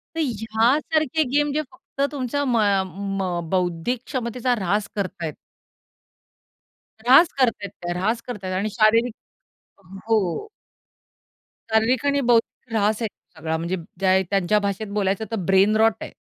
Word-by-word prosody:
तर -, -, -3 dB
ह्या 225 Hz, 0 st, +1 dB
सारखे 315 Hz, 0 st, 0 dB
गेम 295 Hz, 0 st, +2 dB
जे 305 Hz, -, +1 dB
फक्त 345 Hz, -5 st, -9 dB
तुमचा 285 Hz, 0 st, -2 dB
म 240 Hz, -2 st, +2 dB
अ, 200 Hz, -3 st, +3 dB
म 190 Hz, -3 st, -3 dB
बौद्धिक 180 Hz, +6 st, -1 dB
क्षमतेचा 250 Hz, -1 st, -1 dB
ऱ्हास 200 Hz, +1 st, 0 dB
करतायेत. 175 Hz, -6 st, -3 dB, 1.7 s
ऱ्हास 270 Hz, +8 st, +7 dB
करतायेत 230 Hz, -6 st, +1 dB
त्या, 175 Hz, 0 st, -2 dB
ऱ्हास 220 Hz, +6 st, 0 dB
करतायेत 190 Hz, -6 st, -4 dB
आणि 200 Hz, +3 st, -1 dB
शारीरिक 225 Hz, +1 st, +3 dB, 0.9 s
हो. 220 Hz, -, 0 dB, 1.2 s
शारीरिक 225 Hz, +4 st, +2 dB
आणि 285 Hz, 0 st, +2 dB
बौद्धिक 235 Hz, -1 st, 0 dB
ऱ्हास 215 Hz, +1 st, +1 dB
आहे 225 Hz, -, 0 dB
तो 180 Hz, -4 st, -21 dB
सगळा. 160 Hz, 0 st, -2 dB
म्हणजे 170 Hz, +3 st, -2 dB, 0.2 s
ज्या 190 Hz, -1 st, +4 dB
त्यांच्या 200 Hz, +1 st, +2 dB
भाषेत 200 Hz, +1 st, -2 dB
बोलायचं 200 Hz, +1 st, 0 dB
तर -, -, 0 dB
ब्रेनरॉट 210 Hz, +4 st, +4 dB
आहे. -, -, -6 dB
215 Hz, 135 wpm, -23 LUFS, 190-245 Hz, 1.7 s, ऱ्हास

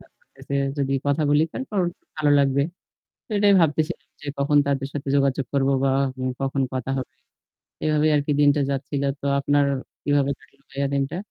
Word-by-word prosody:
কাজ -, -, -21 dB
করতেসে 140 Hz, -, -9 dB, 0.2 s
যদি 135 Hz, -1 st, 0 dB
কথা 145 Hz, +2 st, +1 dB
বলি 145 Hz, +1 st, +4 dB
তারপর 215 Hz, -7 st, -3 dB, 0.4 s
ভালো 150 Hz, -2 st, +2 dB
লাগবে। 140 Hz, 0 st, +3 dB, 0.6 s
তো -, -, -33 dB
এটাই 200 Hz, -1 st, +5 dB
ভাবতেছিলাম 160 Hz, +1 st, 0 dB, 0.2 s
যে 150 Hz, -, -9 dB
কখন 145 Hz, +1 st, +3 dB
তাদের 135 Hz, -1 st, -1 dB
সাথে 140 Hz, -1 st, -4 dB
যোগাযোগ 140 Hz, -1 st, +1 dB
করব 135 Hz, -1 st, +2 dB, 0.2 s
বা 135 Hz, -, +3 dB, 0.5 s
কখন 135 Hz, 0 st, 0 dB
কথা 130 Hz, 0 st, -3 dB
হবে। 130 Hz, -, -4 dB, 0.8 s
এভাবেই 155 Hz, 0 st, +3 dB
আর 145 Hz, -, +3 dB
কি -, -, +1 dB
দিনটা 145 Hz, 0 st, +4 dB
যাচ্ছিল। 140 Hz, +1 st, -2 dB, 0.2 s
তো -, -, -6 dB
আপনার 145 Hz, +1 st, +2 dB, 0.4 s
কিভাবে 145 Hz, -1 st, +2 dB
কাটলো 140 Hz, 0 st, -25 dB
ভাইয়া 140 Hz, 0 st, -1 dB
দিনটা? 140 Hz, +4 st, -1 dB
140 Hz, 170 wpm, -23 LUFS, 135-150 Hz, 0.8 s, এটাই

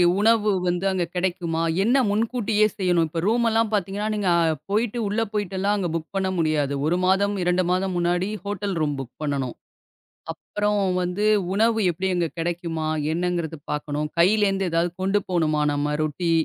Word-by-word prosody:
இ -, -, +6 dB, 0.2 s
உணவு 215 Hz, -1 st, +4 dB, 0.2 s
வந்து 180 Hz, +1 st, 0 dB
அங்க 185 Hz, -2 st, 0 dB
கெடைக்குமா? 175 Hz, -2 st, -1 dB, 0.2 s
என்ன 240 Hz, +6 st, +3 dB
முன்கூட்டியே 215 Hz, 0 st, +1 dB
செய்யணும். 175 Hz, -4 st, +2 dB
இப்ப 165 Hz, +1 st, -3 dB
ரூம் 235 Hz, +2 st, +2 dB
எல்லாம் 225 Hz, -1 st, +1 dB
பாத்தீங்கன்னா, 205 Hz, +2 st, -1 dB
நீங்கப் 170 Hz, -6 st, +2 dB
போயிட்டு 225 Hz, +3 st, 0 dB
உள்ள 210 Hz, +3 st, -1 dB
போயிட்டு 200 Hz, -3 st, -2 dB
எல்லாம் 205 Hz, +2 st, +1 dB
அங்க 190 Hz, -4 st, -1 dB
புக் 160 Hz, -1 st, -3 dB
பண்ண 190 Hz, -1 st, 0 dB
முடியாது. 150 Hz, -3 st, +1 dB
1 175 Hz, +3 st, +2 dB
மாதம், 200 Hz, +2 st, +2 dB
2 180 Hz, +1 st, +2 dB
மாதம் 185 Hz, 0 st, 0 dB
முன்னாடி 175 Hz, +2 st, +1 dB, 0.2 s
ஹோட்டல் 205 Hz, -1 st, -3 dB
ரூம் 145 Hz, -2 st, 0 dB
புக் 130 Hz, -2 st, -7 dB
பண்ணனும். 140 Hz, -4 st, -2 dB, 0.8 s
அப்புறம் 210 Hz, 0 st, -2 dB, 0.2 s
வந்து 180 Hz, +4 st, -1 dB, 0.3 s
உணவு 225 Hz, +2 st, +2 dB
எப்படி? 185 Hz, +3 st, -3 dB
அங்க 175 Hz, -1 st, +1 dB
கிடைக்குமா 165 Hz, -2 st, -2 dB, 0.2 s
என்னங்கறது 170 Hz, -2 st, -2 dB
பாக்கணும். 150 Hz, 0 st, -2 dB
கையிலருந்து 195 Hz, 0 st, +3 dB
ஏதாவது 170 Hz, +1 st, +1 dB
கொண்டு 195 Hz, +2 st, +2 dB
போகணுமா 155 Hz, -4 st, +1 dB
நம்ம? 145 Hz, +1 st, -1 dB
ரொட்டி, 160 Hz, +3 st, -1 dB
180 Hz, 160 wpm, -24 LUFS, 165-205 Hz, 0.8 s, இ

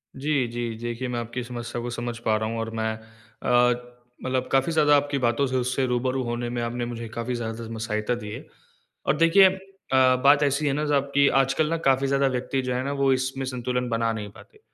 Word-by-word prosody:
जी, 140 Hz, -2 st, 0 dB
जी। 120 Hz, -1 st, -4 dB
देखिए 120 Hz, +2 st, -3 dB
मैं 120 Hz, -1 st, -2 dB
आपकी 120 Hz, +1 st, -4 dB
समस्या 120 Hz, -1 st, -5 dB
को 120 Hz, -, -4 dB
समझ 120 Hz, -1 st, -4 dB
पा 110 Hz, -, +3 dB
रहा 110 Hz, 0 st, -2 dB
हूँ 115 Hz, 0 st, -3 dB
और 115 Hz, 0 st, -3 dB
मैं 110 Hz, 0 st, -1 dB
अ, 120 Hz, +2 st, -1 dB, 0.3 s
मतलब 130 Hz, 0 st, -1 dB
काफ़ी 135 Hz, +5 st, +2 dB
ज़्यादा 150 Hz, -2 st, +4 dB
आपकी 145 Hz, 0 st, -1 dB
बातों 125 Hz, +2 st, +1 dB
से 130 Hz, -, -3 dB
उससे 130 Hz, +1 st, 0 dB
रूबरू 130 Hz, +2 st, 0 dB
होने 120 Hz, 0 st, -3 dB
में 120 Hz, 0 st, -3 dB
आपने 120 Hz, +1 st, -2 dB
मुझे 115 Hz, -1 st, -6 dB
काफ़ी 115 Hz, +2 st, -3 dB
ज़्यादा 115 Hz, -1 st, -5 dB
में 115 Hz, -, -6 dB
सहायता 110 Hz, +1 st, -1 dB
दी 105 Hz, -3 st, -7 dB
है। -, -, -8 dB, 0.6 s
और 135 Hz, -, +3 dB
देखिए 165 Hz, +4 st, +6 dB
अ, 190 Hz, -, 0 dB, 0.7 s
बात 145 Hz, +1 st, +6 dB
ऐसी 145 Hz, +1 st, +1 dB
है 135 Hz, -, +2 dB
ना, 150 Hz, +1 st, -1 dB
साब 140 Hz, -2 st, +2 dB
की 140 Hz, 0 st, +5 dB
आजकल 135 Hz, +4 st, +1 dB
ना 165 Hz, -, 0 dB
काफ़ी 135 Hz, +1 st, +2 dB
ज़्यादा 140 Hz, 0 st, +2 dB
व्यक्ति 130 Hz, +1 st, -1 dB
जो 125 Hz, -1 st, -2 dB
है 125 Hz, -, -1 dB
ना 140 Hz, -, -2 dB
वो 135 Hz, -1 st, +4 dB
इसमें 130 Hz, +1 st, -2 dB
संतुलन 125 Hz, -1 st, -2 dB
बना 115 Hz, -1 st, +1 dB
नहीं 105 Hz, -2 st, -5 dB
पाते। 265 Hz, -, -17 dB
125 Hz, 225 wpm, -25 LUFS, 115-135 Hz, 0.7 s, देखिए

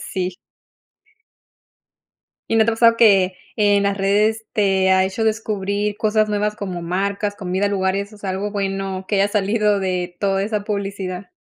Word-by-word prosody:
sí. 185 Hz, -1 st, -4 dB, 2.1 s
¿Y 225 Hz, -, +2 dB
no 220 Hz, -, +5 dB
te -, -, +3 dB
ha -, -, -1 dB
pasado 230 Hz, 0 st, +5 dB
que, 195 Hz, -5 st, +4 dB, 0.2 s
en 205 Hz, -1 st, +3 dB
las 200 Hz, 0 st, 0 dB
redes 210 Hz, +3 st, +1 dB
te 195 Hz, -2 st, +2 dB
ha 190 Hz, 0 st, +4 dB
hecho 195 Hz, +4 st, -2 dB
descubrir 210 Hz, -1 st, -1 dB
cosas 215 Hz, -1 st, +1 dB
nuevas 210 Hz, 0 st, -1 dB
como 185 Hz, -5 st, -5 dB
marcas, 200 Hz, +4 st, -2 dB
comida, 190 Hz, +2 st, -1 dB
lugares, 200 Hz, +1 st, -1 dB
o 210 Hz, -, -14 dB
sea, 195 Hz, -2 st, -4 dB
algo 195 Hz, +2 st, -3 dB
bueno 195 Hz, -2 st, -3 dB
que -, -, 0 dB
haya 200 Hz, +1 st, +3 dB
salido 210 Hz, 0 st, +1 dB
de 180 Hz, -2 st, -2 dB
toda 195 Hz, -1 st, +1 dB
esa 210 Hz, 0 st, -2 dB
publicidad? 195 Hz, -3 st, -4 dB
200 Hz, 165 wpm, -20 LUFS, 190-210 Hz, 2.1 s, no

